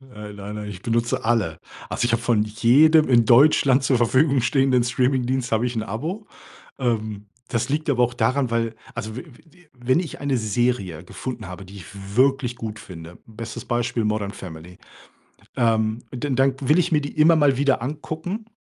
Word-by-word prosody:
Äh, 105 Hz, 0 st, -8 dB
nein, 100 Hz, +1 st, -8 dB
nein. 105 Hz, -1 st, -6 dB
Ich 95 Hz, -2 st, -9 dB
benutze 115 Hz, 0 st, -1 dB
alle. 110 Hz, -9 st, 0 dB, 0.3 s
Also, -, -, -2 dB
ich 120 Hz, -, +1 dB
habe 115 Hz, 0 st, +1 dB
von 115 Hz, -3 st, +2 dB
jedem 130 Hz, +9 st, +4 dB
in 120 Hz, -3 st, +5 dB
Deutschland 135 Hz, +2 st, +5 dB
zur 130 Hz, -1 st, +2 dB
Verfügung 130 Hz, +4 st, +3 dB
stehenden 130 Hz, 0 st, +2 dB
Streamingdienst 125 Hz, 0 st, 0 dB
habe 115 Hz, +2 st, +2 dB
ich 125 Hz, -, -3 dB
'n 110 Hz, -, -2 dB
Abo. 155 Hz, -, -5 dB, 0.5 s
Ähm, 110 Hz, -4 st, -2 dB, 0.2 s
das 115 Hz, +1 st, -1 dB
liegt 155 Hz, +2 st, -1 dB
aber 125 Hz, -3 st, +3 dB
auch 120 Hz, 0 st, 0 dB
daran, 130 Hz, 0 st, 0 dB
weil 115 Hz, -1 st, -1 dB, 0.2 s
also 110 Hz, 0 st, -6 dB
we 125 Hz, -, -6 dB
we 160 Hz, -, -16 dB, 0.2 s
wi 180 Hz, -2 st, -23 dB
wenn 130 Hz, +5 st, +1 dB
ich 165 Hz, -, -8 dB
eine 140 Hz, -2 st, 0 dB
Serie 105 Hz, -6 st, -1 dB
gefunden 120 Hz, 0 st, -7 dB
habe, 90 Hz, +1 st, -8 dB
die 95 Hz, +2 st, -13 dB
ich 90 Hz, -5 st, -10 dB, 0.3 s
wirklich 130 Hz, -1 st, +2 dB
gut 110 Hz, -2 st, -6 dB
finde. 85 Hz, -3 st, -11 dB
Bestes 115 Hz, +1 st, -8 dB
Beispiel 120 Hz, -1 st, -1 dB
„Modern 105 Hz, -2 st, -1 dB
Family”, 90 Hz, -2 st, -10 dB, 0.8 s
ähm, 110 Hz, -2 st, +1 dB
dann 130 Hz, +1 st, -3 dB
dann 135 Hz, 0 st, +3 dB
will 150 Hz, +6 st, +3 dB
ich 175 Hz, -, +1 dB
mir 150 Hz, -, +4 dB
die 145 Hz, -, -7 dB
immer 160 Hz, +2 st, +6 dB
mal 145 Hz, -3 st, +3 dB
wieder 140 Hz, -3 st, +2 dB
angucken. 160 Hz, -, -5 dB
120 Hz, 185 wpm, -23 LUFS, 110-135 Hz, 0.8 s, immer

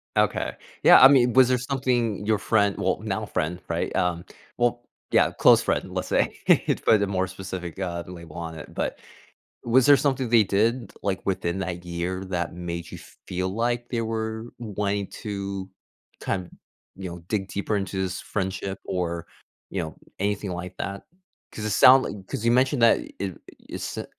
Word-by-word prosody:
Okay. -, -, +1 dB, 0.3 s
Yeah, -, -, +9 dB
I 130 Hz, -, +12 dB
mean, 125 Hz, -3 st, +4 dB
was 130 Hz, -1 st, +7 dB
there 125 Hz, -, +3 dB
something 125 Hz, -5 st, -1 dB
your 110 Hz, -1 st, +2 dB
friend 105 Hz, -3 st, +2 dB
well, -, -, 0 dB
now -, -, -2 dB
friend, 85 Hz, +4 st, -2 dB
right? -, -, -2 dB
Um, 90 Hz, -1 st, 0 dB, 0.3 s
well 120 Hz, 0 st, +1 dB, 0.3 s
Yeah, -, -, +4 dB
close -, -, +5 dB
friend, -, -, -1 dB
let's -, -, -2 dB
say, -, -, +3 dB, 0.4 s
to -, -, +3 dB
put 110 Hz, -2 st, +5 dB
a 100 Hz, -, +1 dB
more 95 Hz, -1 st, 0 dB
specific, 95 Hz, -2 st, -7 dB
uh, 85 Hz, -2 st, -3 dB
label 85 Hz, -3 st, -10 dB
on 80 Hz, -1 st, -5 dB
it. -, -, -11 dB
But -, -, -2 dB, 0.7 s
was 120 Hz, +2 st, +4 dB
there 145 Hz, -1 st, +8 dB
something 135 Hz, -4 st, 0 dB
they 115 Hz, -2 st, +5 dB
did, 110 Hz, +3 st, 0 dB
like, 95 Hz, -1 st, -2 dB
within 95 Hz, -1 st, -1 dB
that 90 Hz, -2 st, -4 dB
year 90 Hz, +2 st, -3 dB
that 85 Hz, -2 st, -2 dB
made 85 Hz, -1 st, -5 dB
you -, -, -7 dB, 0.3 s
feel 95 Hz, 0 st, -2 dB
like 120 Hz, +4 st, -1 dB
they 115 Hz, -2 st, -1 dB
were 110 Hz, 0 st, -3 dB
wanting 100 Hz, -3 st, -2 dB, 0.2 s
to 100 Hz, -2 st, -4 dB, 0.5 s
kin 95 Hz, -2 st, -3 dB, 0.5 s
you 95 Hz, -2 st, -6 dB
know, 85 Hz, 0 st, -8 dB
dig 100 Hz, -3 st, -1 dB
deeper 100 Hz, +2 st, -2 dB
into 95 Hz, -1 st, -2 dB
this 95 Hz, 0 st, -3 dB
friendship 95 Hz, -1 st, -3 dB
or, 85 Hz, -2 st, -3 dB, 0.4 s
you 95 Hz, -, -2 dB
know, 80 Hz, -, -7 dB, 0.2 s
anything 100 Hz, 0 st, -1 dB
like 90 Hz, +1 st, -6 dB
that? 100 Hz, 0 st, -4 dB, 0.5 s
'Cause 105 Hz, -, -6 dB
it 105 Hz, -, -1 dB
sound 130 Hz, +6 st, +7 dB
li 100 Hz, -, -6 dB
'cause 110 Hz, -, -4 dB
you 115 Hz, -, +4 dB
mentioned 130 Hz, 0 st, +2 dB
that 115 Hz, -, +6 dB, 0.2 s
i 95 Hz, -3 st, -3 dB, 0.3 s
it -, -, -6 dB
sou -, -, -4 dB
100 Hz, 180 wpm, -25 LUFS, 90-115 Hz, 0.7 s, I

